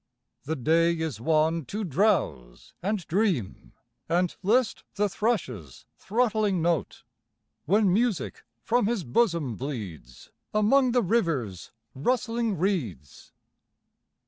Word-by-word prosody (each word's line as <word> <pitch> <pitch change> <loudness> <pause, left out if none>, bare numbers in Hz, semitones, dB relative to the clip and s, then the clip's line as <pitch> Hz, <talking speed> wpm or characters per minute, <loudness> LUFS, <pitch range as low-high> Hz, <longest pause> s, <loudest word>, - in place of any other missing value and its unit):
The 160 +3 -1
day 165 +5 +2
is 160 -9 -4
one 160 +2 +2
to 210 - -4
drowse 145 - 0
and 195 -1 -2
dream 165 - -1 0.4
And 175 +1 +1
list 225 +5 +1
the 210 +1 +2
thrush's 160 - -3
throttling 215 -3 +1
note. 165 -6 -1 0.6
When 200 +1 +3
music 215 - 0 0.2
from 240 - +2
his 230 -5 -1
bosom 160 - +1
bleeds 100 - -7 0.2
Among 245 +4 +4
the 245 - +3
river's 155 - -1 0.2
rustling 230 - 0
reeds. 130 - -3
175 Hz, 105 wpm, -27 LUFS, 135-215 Hz, 0.6 s, Among